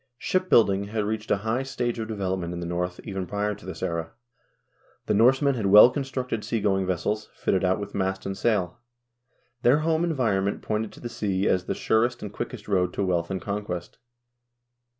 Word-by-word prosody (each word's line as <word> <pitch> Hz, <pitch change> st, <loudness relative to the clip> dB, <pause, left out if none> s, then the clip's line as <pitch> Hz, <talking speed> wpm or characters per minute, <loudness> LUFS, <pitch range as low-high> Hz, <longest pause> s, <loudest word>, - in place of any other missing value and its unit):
Ship 185 Hz, +7 st, -1 dB
building 100 Hz, -3 st, +4 dB
had 105 Hz, +1 st, -2 dB
reached 105 Hz, +1 st, -3 dB
a -, -, +3 dB
high 115 Hz, +4 st, +1 dB
stage 120 Hz, -3 st, -2 dB
of 110 Hz, -, -3 dB
development 95 Hz, -5 st, -2 dB
in -, -, -5 dB
the 85 Hz, -, -4 dB
North 90 Hz, +1 st, -3 dB
even 95 Hz, -3 st, -4 dB
prior 105 Hz, +2 st, -1 dB
to 105 Hz, -, -12 dB
this 95 Hz, -, -6 dB
era. 85 Hz, -1 st, -3 dB, 0.9 s
The -, -, +1 dB
Norsemen 135 Hz, +6 st, +4 dB
had 110 Hz, -6 st, -1 dB
well 105 Hz, +5 st, +9 dB
constructed 130 Hz, -5 st, -3 dB
sea 115 Hz, -, -1 dB
going 95 Hz, -2 st, +1 dB
vessels, 100 Hz, +4 st, -2 dB
fitted 95 Hz, -, 0 dB
out 95 Hz, +1 st, +2 dB
with 100 Hz, 0 st, -6 dB
mast 95 Hz, 0 st, -2 dB
and 95 Hz, -, -3 dB
sail. 105 Hz, -2 st, 0 dB, 0.8 s
Their 135 Hz, +6 st, +4 dB
home 165 Hz, 0 st, +2 dB
environ 125 Hz, -, +1 dB
ment 100 Hz, -, -2 dB
pointed 110 Hz, 0 st, -2 dB
to -, -, -13 dB
the 120 Hz, -, -4 dB
sea 100 Hz, -4 st, -1 dB
as 90 Hz, -1 st, +1 dB
the -, -, -2 dB
surest 120 Hz, +2 st, +1 dB
and 105 Hz, -1 st, -6 dB
quickest 120 Hz, -3 st, -6 dB
road 90 Hz, -3 st, +1 dB
to -, -, -1 dB
wealth 85 Hz, -2 st, 0 dB
and 95 Hz, -1 st, -2 dB
conquest. 100 Hz, -4 st, -5 dB
105 Hz, 195 wpm, -26 LUFS, 95-120 Hz, 0.9 s, well